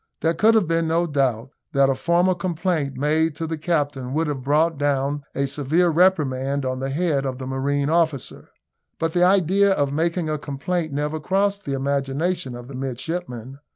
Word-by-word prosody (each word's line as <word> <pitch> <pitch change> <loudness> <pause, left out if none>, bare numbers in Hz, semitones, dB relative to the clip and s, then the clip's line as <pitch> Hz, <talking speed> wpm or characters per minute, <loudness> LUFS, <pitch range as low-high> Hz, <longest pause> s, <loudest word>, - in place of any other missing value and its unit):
There 165 0 +2
could 220 +6 +4
have 210 -6 +3
been 165 0 +1
no 165 +2 +2
doubt 135 -5 0 0.2
that 140 -1 +4
a - - +2
formal 170 +7 +2
complaint 170 -4 -2
made 155 +2 +1
to 165 - -4
the 160 0 -3
captain 145 -5 -2
would 160 +1 +1
have 145 -3 -3
brought 150 +3 +1
down 145 0 0
a 140 - +1
severe 150 +6 +1
reprimand 140 -6 +2
on 130 0 -2
the 135 +1 -3
head 145 -1 0
of 130 -2 -3
the 130 - -6
marine 140 +2 -1
officer, 160 -5 -1 0.5
but 165 0 -1
the 175 - +3
idea 195 +2 +4
of 140 -5 0
making 170 +2 0
a 155 -1 -2
complaint 155 +3 -3
never 150 +2 -2
crossed 200 +5 0
the 140 - -2
imagination 140 +3 -1
of 120 0 -9
the 140 - -10
midshipman. 130 -1 -5
150 Hz, 185 wpm, -23 LUFS, 135-170 Hz, 0.5 s, could